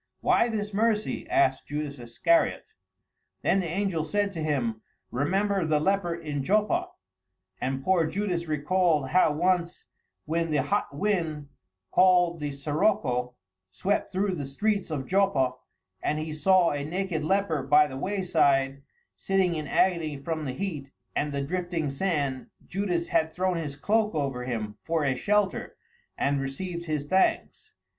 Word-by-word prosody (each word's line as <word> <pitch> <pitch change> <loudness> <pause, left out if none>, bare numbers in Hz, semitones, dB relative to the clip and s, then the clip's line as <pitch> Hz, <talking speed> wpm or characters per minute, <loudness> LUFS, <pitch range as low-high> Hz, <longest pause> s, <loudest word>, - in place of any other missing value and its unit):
"Why 240 - +3
this 210 -2 -3
mercy?" 220 +8 0
asked 350 0 +2
Judas 145 -1 -4
Iscariot. 120 - +1 0.7
Then 195 - +3
the 180 - -2
angel 175 -1 -1
said 205 +5 0
to 170 - -6
him, 125 -8 -1 0.3
"Remember 195 +8 +1
the 155 -2 +2
leper 190 0 +1
in 150 -4 -4
Joppa," 215 - +1 0.7
and 135 +1 -2
poor 175 -2 +3
Judas 180 -2 -2
recalled 155 -1 +1
how 180 -1 +4
once 175 +2 0 0.4
when 165 +2 -1
the 150 -3 +1
hot 205 -6 -1
wind, 160 -7 -1 0.4
called 180 -2 +4
the 150 -1 -2
sirocco, 140 - 0 0.3
swept 190 - -1
through 195 +1 0
the 145 -6 -4
streets 200 +8 -1
of 145 -4 -3
Joppa, 190 -9 +2 0.5
and 150 - 0
he 155 0 -4
saw 180 +2 +4
a 145 -1 -2
naked 175 0 -2
leper 180 -3 +1
by 145 +3 +5
the 140 -3 -7
wayside, 140 -6 +1 0.3
sitting 190 -2 +1
in 155 -2 -4
agony 165 -3 +1
from 155 +2 -4
the 130 - -3
heat 155 -6 -4 0.3
and 145 0 0
the 140 -1 -2
drifting 175 -1 -2
sand, 140 -5 -1 0.2
Judas 180 -3 -2
had 160 0 +2
thrown 185 +1 0
his 150 -4 -4
cloak 210 +6 +1
over 135 -4 -2
him 110 -4 -4
for 165 -2 -1
a 135 -2 +1
shelter 205 +7 0 0.4
and 140 0 +1
received 170 +6 -4
his 155 -3 -2
thanks. 190 - 0
165 Hz, 150 wpm, -27 LUFS, 145-190 Hz, 0.7 s, by